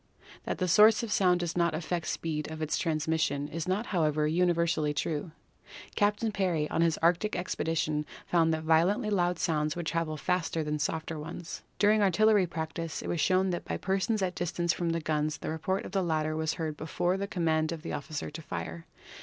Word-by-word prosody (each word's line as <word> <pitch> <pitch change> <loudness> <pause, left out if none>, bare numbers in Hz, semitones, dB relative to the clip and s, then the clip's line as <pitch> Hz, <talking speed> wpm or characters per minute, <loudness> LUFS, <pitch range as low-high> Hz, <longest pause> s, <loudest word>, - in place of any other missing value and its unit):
That - - -2
the 185 - 0
source 215 +5 +6
of 225 - -4
sound 180 -3 +3
does 170 -1 -2
not 170 -2 +2
affect 170 0 -2
the - - 0
speed 155 -2 -3
of 160 0 -7
its 155 -1 -1
transmission 155 -3 0
is 165 +2 -5
not, 195 +5 0
however, 155 -6 +1
universally 170 -2 +1
true. 150 +2 -2 0.7
Captain 210 +1 +1
Parry, 180 -7 0
on - - +1
his 165 -2 +2
Arctic 175 +5 +2
expedition, 160 -4 -1 0.2
found 165 -2 +3
that 160 0 -1
violently 180 +8 +3
loud 175 -3 +1
sounds 155 -3 0
would 175 -1 -4
travel 160 -1 -1
faster 165 0 -1
than 150 0 -2
softer 160 +2 -2
ones. 165 +3 -7 0.2
During 210 +1 +4
artil 200 +2 +3
lery 210 -4 +5
practice 160 0 -4
it - - -5
was 170 - 0
shown 185 0 +3
that 175 - -3
by - - -2
persons 195 +2 0
at 185 -1 0
distance 175 -1 -1
from 170 +1 -2
the 165 0 0
guns 155 0 -1
the - - -4
report 190 +5 -2
of - - -7
the 195 0 +1
latter 155 -3 0
was 160 0 -1
heard 160 -3 -3
before 175 +4 -1
the 200 +1 -3
command 160 -4 0
of 165 -2 -6
the - - -4
officer 145 +1 -4
to 155 +2 -7
fire. 85 - -6
165 Hz, 205 wpm, -29 LUFS, 155-180 Hz, 0.7 s, source